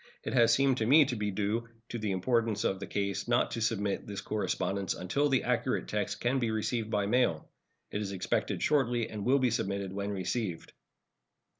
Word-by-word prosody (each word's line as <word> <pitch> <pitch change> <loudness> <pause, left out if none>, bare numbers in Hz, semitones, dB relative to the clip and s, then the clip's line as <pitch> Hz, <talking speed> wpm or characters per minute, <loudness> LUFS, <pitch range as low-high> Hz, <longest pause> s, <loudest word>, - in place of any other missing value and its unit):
It - - -3
has 120 -2 +5
seemed 135 +2 +3
to 110 - 0
me 145 +4 +7
to 125 - -2
be 105 -2 -1
due 105 +4 -1 0.2
to 120 - -4
the 105 -1 -2
importance 115 +3 +1
of 95 -4 0
the - - -6
case 100 0 -2
not 120 0 +2
to 115 - -3
submit 105 -3 -1
this 100 -1 -5
correspondence 100 -2 -1
until 140 +11 0
the 130 -2 +2
accurate 125 +1 0
text 105 0 -2
can 130 +3 +1
be 120 -2 0
received 110 +1 -1
by 105 -2 +1
mail. 105 -8 +1 0.4
It 105 - -2
is 100 -2 -3
expected 95 -1 -1
shortly, 120 -6 +2
and 105 -2 -5
will 130 +5 +4
be 130 -3 +2
submitted 100 -4 -2
when 100 +1 -3
received. 95 -1 -3
110 Hz, 195 wpm, -30 LUFS, 100-120 Hz, 0.4 s, me